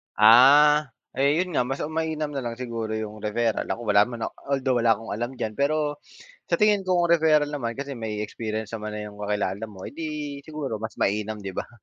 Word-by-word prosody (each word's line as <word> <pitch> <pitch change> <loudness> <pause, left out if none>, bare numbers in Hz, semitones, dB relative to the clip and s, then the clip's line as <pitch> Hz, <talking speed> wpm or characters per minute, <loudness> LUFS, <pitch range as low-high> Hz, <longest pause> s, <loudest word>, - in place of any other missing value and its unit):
Ah, 140 +7 +7 0.3
yun 150 +7 +2
nga 125 - +1
mas 135 +1 -3
mainam 155 -2 -2
na 140 - -3
lang 115 0 -3
siguro 115 -3 -4
yung 110 -1 -5
referral, 110 +1 -1
ako - - -3
wala 100 0 +6
man 120 -2 -7 0.3
although 135 -2 +1
wala 115 -1 +4
akong 115 +2 -9
alam 120 +4 -3
diyan 110 -3 -3
pero, 145 +1 0 0.5
sa - - +2
tingin 210 -2 +4
ko 180 -2 +2
ang 170 - 0
referral 155 -3 +4
naman 120 -5 -3
kasi 140 0 -4
may 110 -3 -4
experience 110 0 -5
naman 110 -1 -5
na 105 - -5
yung 105 0 -11
kakilala 105 0 -2
mo 95 -3 -11
eh - - -8
di 150 -3 -5
siguro 140 -7 -5
mas 110 - -5
mainam, 105 +2 0
di 100 -2 -6
ba? - - -4
120 Hz, 205 wpm, -25 LUFS, 110-150 Hz, 0.5 s, Ah